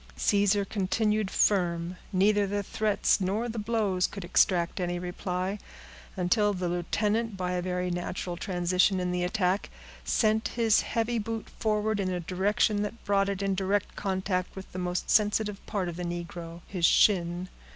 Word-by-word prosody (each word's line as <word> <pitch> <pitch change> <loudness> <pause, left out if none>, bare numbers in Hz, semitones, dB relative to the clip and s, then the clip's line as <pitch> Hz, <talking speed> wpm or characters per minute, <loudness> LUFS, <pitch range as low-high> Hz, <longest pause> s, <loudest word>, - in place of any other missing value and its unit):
Caesar 200 0 +2
continued 210 +1 0
firm. 175 -4 +1 0.2
Neither 205 +2 +3
the 205 +1 -1
threats 210 0 +1
nor 205 +6 0
the 230 -1 -4
blows 210 -4 +1
could 195 -3 -7
extract 175 0 +2
any 175 -1 -1
reply, 180 +2 -3 0.6
until 205 +3 +2
the 180 -2 -2
lieutenant, 205 +5 -1
by 180 -1 -2
a 180 0 -1
very 180 0 -2
natural 175 0 -3
transition 180 +1 +1
in 180 0 -1
the 180 0 -1
attack, 185 +1 0 0.3
sent 220 0 +2
his 225 -2 +4
heavy 230 +1 -1
boot 225 +1 -4
forward 215 -1 -1
in 190 -2 0
a 180 -1 -2
direction 205 +4 +1
that 210 +3 -5
brought 200 -1 +2
it 200 0 -2
in 195 0 +1
direct 195 +2 -1
contact 190 -2 -2
with 190 -1 -9
the 185 - -5
most 180 0 -2
sensitive 210 -1 +2
part 195 -3 -1
of 175 -1 -5
the 180 - -4
negro—his 170 +1 -6
shin. 175 0 +4
190 Hz, 160 wpm, -28 LUFS, 180-210 Hz, 0.6 s, his